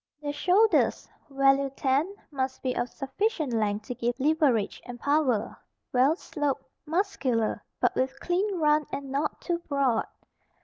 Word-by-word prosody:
The 290 - -1
shoulders 400 +8 +3 0.2
(value 275 0 +3
10) 290 +9 +1 0.2
must 265 -2 -3
be 255 -1 0
of 245 - -1
sufficient 295 - -2
length 210 -1 0
to - - -4
give 240 +1 -2
leverage 280 -7 +2
and 245 -1 -8
power, 275 -7 +1 0.4
well 260 +5 +4
sloped, 290 -6 -2 0.2
muscular, 300 - 0 0.2
but - - +2
with 265 +1 -1
clean 380 +3 0
run 300 -1 +3
and 275 -1 -5
not 280 +3 -1
too 345 -2 -1
broad. 275 -5 +1
275 Hz, 140 wpm, -27 LUFS, 255-310 Hz, 0.4 s, well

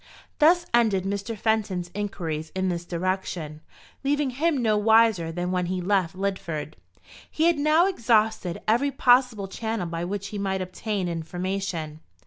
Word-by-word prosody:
Thus 340 +3 +5
ended 220 -6 +3
Mr. 200 +3 -3
Fenton's 200 -5 -1
inquiries 165 -6 -4
in 190 0 0
this 175 -1 -3
direction, 175 -3 -3 0.4
leaving 285 -1 +1
him 300 +4 +1
no 225 -4 +2
wiser 215 -5 +4
than 175 +2 -3
when 180 -1 0
he 185 +1 -2
left 185 -2 0
Lidford. 175 -6 -3 0.6
He 315 - -1
had 335 -2 +3
now 305 +4 +4
exhausted 220 - +1
every 240 +6 +3
possible 245 -6 +3
channel 220 0 -3
by 165 0 -4
which 200 +1 -4
he 205 - -5
might 190 -1 -1
obtain 190 +1 -3
information. 170 -1 -4
195 Hz, 145 wpm, -25 LUFS, 175-230 Hz, 0.6 s, Thus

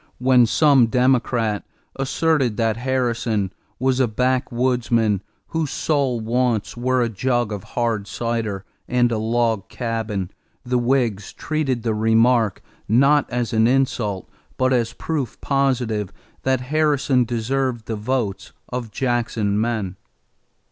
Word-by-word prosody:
When 125 -1 +4
some 140 -1 +5
Democrat 120 -3 +1 0.3
asserted 135 -3 +1
that 115 -2 +1
Harrison 115 -5 -1 0.2
was 130 0 +1
a 130 - +3
backwoodsman 120 -3 +1 0.3
whose 160 -3 -1
sole 140 -6 0
wants 115 -1 0
were 125 +1 +1
a - - +1
jug 120 +1 -1
of 100 -3 -5
hard 115 -4 0
cider 110 -5 -3 0.2
and 120 -1 +2
a 110 - 0
log 115 -2 0
cabin, 110 -5 -3 0.3
the 125 0 +1
Whigs 120 -5 0
treated 140 -7 -2
the 115 -2 0
remark 110 0 +2 0.3
not 140 +6 +4
as 120 -1 -2
an 110 0 +4
insult 120 -7 0 0.3
but 130 0 +2
as 115 -2 0
proof 150 -6 -3
positive 125 -7 0 0.3
that 130 -1 +1
Harrison 145 -2 +2
deserved 120 0 -2
the 110 - -3
votes 105 -3 -2 0.2
of 125 -2 -4
Jackson 115 -4 0
men. 110 -5 -2
120 Hz, 125 wpm, -21 LUFS, 110-130 Hz, 0.3 s, some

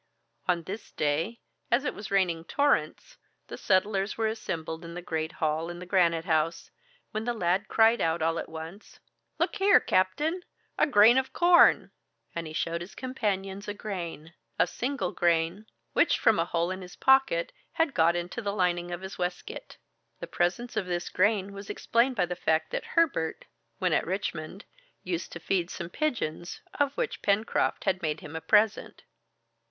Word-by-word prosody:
On 175 -2 +1
this 200 +6 -7
day, 160 +10 -1 0.3
as 250 +5 +2
it - - -1
was 205 - -8
raining 185 -4 +2
in - - -12
torrents, 285 +7 0 0.3
the - - -5
settlers 195 +1 +1
were 225 - 0
assembled 165 -7 -4
in 170 0 -8
the 175 - -5
great 160 -1 -3
hall 160 +1 -1
in 175 - -6
Granite 170 -3 +2
House, 160 -1 0 0.4
when 215 +1 -3
the 240 0 -1
lad 185 +1 0
cried 225 +1 +4
out 165 +1 +1
all 165 +1 +1
at - - -6
once, 160 +6 -9 0.4
"Look - - 0
here, 400 0 +6
captain 295 - +1 0.3
A - - +3
grain 235 0 +6
of 265 - -5
corn!" 345 0 +5 0.4
And 170 -1 -4
he - - -8
showed 170 +1 -2
his 175 +3 -9
companions 200 -6 -3
a 205 - -4
grain 170 -6 -6 0.2
a - - +4
single 245 -8 -3
grain 170 +4 0 0.3
which - - +3
from 220 - +3
a 165 - +2
hole 170 +1 -1
in 185 0 -5
his 180 -1 -10
pocket 270 - +3 0.2
had 325 -4 +1
got 165 +1 +3
into 175 +7 -4
the 200 -2 -2
lining 175 -2 0
of 175 0 -5
his 190 0 -8
waistcoat. 180 - -5 0.4
The - - -5
presence 190 +8 -1
of 185 - -1
this 175 -1 -2
grain 200 0 +1
was 200 0 -9
explained 245 +3 +1
by 185 -5 +2
the 180 0 -4
fact 160 -2 0
that - - -3
Herbert, 275 - +1 0.3
when - - +1
at - - +1
Richmond, 185 -1 -4 0.4
used 180 -1 -3
to 170 - -6
feed 175 +1 -1
some 170 -2 -6
pigeons, 205 - -3 0.2
of 285 -1 +1
which - - -2
Pencroft 205 +2 +1
had 190 -1 0
made 155 -2 -2
him 155 +1 -9
a 160 - -4
present. 210 +2 +2
185 Hz, 180 wpm, -28 LUFS, 170-220 Hz, 0.4 s, here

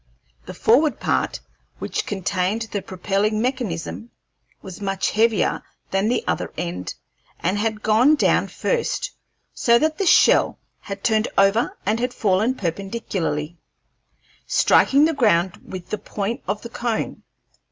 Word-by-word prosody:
The - - -7
forward 290 +7 +3
part, - - -1 0.4
which - - -3
contained 190 +2 -1
the 205 - -2
propelling 195 +3 -1
mechanism, 235 -4 -3 0.5
was 190 +1 -9
much 195 -1 -1
heavier 220 -1 +2 0.3
than 195 +3 +1
the 245 - 0
other - - -2
end, 90 +2 -4 0.4
and 185 +4 0
had 215 0 -2
gone 235 +8 +5
down - - +2
first, - - -2 0.4
so 235 -2 +4
that 310 +7 0
the 390 - +1
shell - - +5 0.2
had 200 0 -8
turned 220 -1 +2
over 220 - +3
and 220 +2 +1
had 250 +1 -2
fallen 215 +5 +1
perpendicularly, 175 - -3 0.9
striking 280 +2 +4
the 325 - +1
ground 190 - +2
with 185 -2 -8
the 215 - -2
point 215 +6 -4
of 205 +2 -2
the 235 - -7
cone. 235 -1 -3
215 Hz, 135 wpm, -22 LUFS, 190-240 Hz, 0.9 s, gone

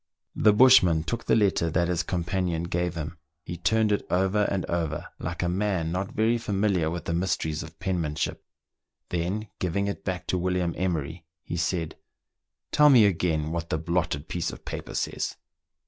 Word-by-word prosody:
The 105 - +5
bushman 105 -9 +6
took 115 +7 -4
the - - +3
letter 100 -6 +2
that 85 +2 +1
his 85 -1 0
companion 90 -1 -1
gave 85 0 -1
him. 80 +1 -5 0.2
He 85 - -6
turned 105 +5 +2
it 105 - +1
over 95 +3 +2
and 95 -4 -1
over 80 -3 -2
like 85 +2 -3
a - - +1
man 90 -3 0
not 95 +4 -2
very 115 -1 +2
familiar 100 -6 +1
with 85 +1 -5
the 85 - -1
mysteries 85 -3 -1
of 80 -1 -10
penmanship; 85 -5 -2 0.7
then 95 +5 -2
giving 95 +3 0
it 100 - -4
back 90 -2 -3
to 90 - +1
William 90 -1 0
Emer}'', 85 -3 -2 0.2
he - - -5
said, 85 -1 -2 0.4
" - - -61
Tell 150 0 +6
me 120 -6 +7
again 80 -5 +1
what 85 0 -3
the - - 0
blotted 80 -2 -1
piece 85 +1 -2
of - - -10
paper - - -6
says." - - -2
90 Hz, 180 wpm, -26 LUFS, 80-100 Hz, 0.7 s, me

